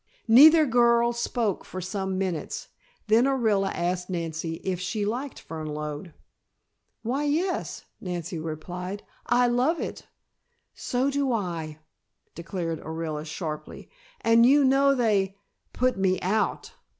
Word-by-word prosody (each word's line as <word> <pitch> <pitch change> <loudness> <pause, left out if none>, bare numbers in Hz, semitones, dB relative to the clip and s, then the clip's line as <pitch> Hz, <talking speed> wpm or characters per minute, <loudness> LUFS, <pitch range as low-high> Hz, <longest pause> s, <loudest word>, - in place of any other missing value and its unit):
Neither 305 +7 +8
girl 235 -1 +3
spoke 235 -4 -1
for 185 - -7
some 190 +1 -3
minutes. 185 -5 -3 0.4
Then 225 +3 +4
Orilla 220 -8 +2
asked 180 +1 -2
Nancy 165 -2 -3
if 185 -2 -2
she 205 +3 -2
liked 250 +6 -4
Fernlode. 150 +1 -5 0.9
"Why, 265 +6 -1
yes," 330 +6 -1
Nancy 175 -2 -4
replied, 180 +5 -6 0.2
"I 245 +1 +4
love 250 +7 +2
it." - - -6 0.7
"So 255 +3 -1
do 280 -1 0
I," 170 -8 -3 0.6
declared 170 -2 -4
Orilla 160 -1 -5
sharply, 155 0 -6 0.3
"and 230 0 +5
you 280 +4 +6
know 275 +1 +4
they 200 -5 +1 0.3
put 255 -2 0
me 185 -1 +2
out!" 200 +2 -1
195 Hz, 120 wpm, -26 LUFS, 170-245 Hz, 0.9 s, Neither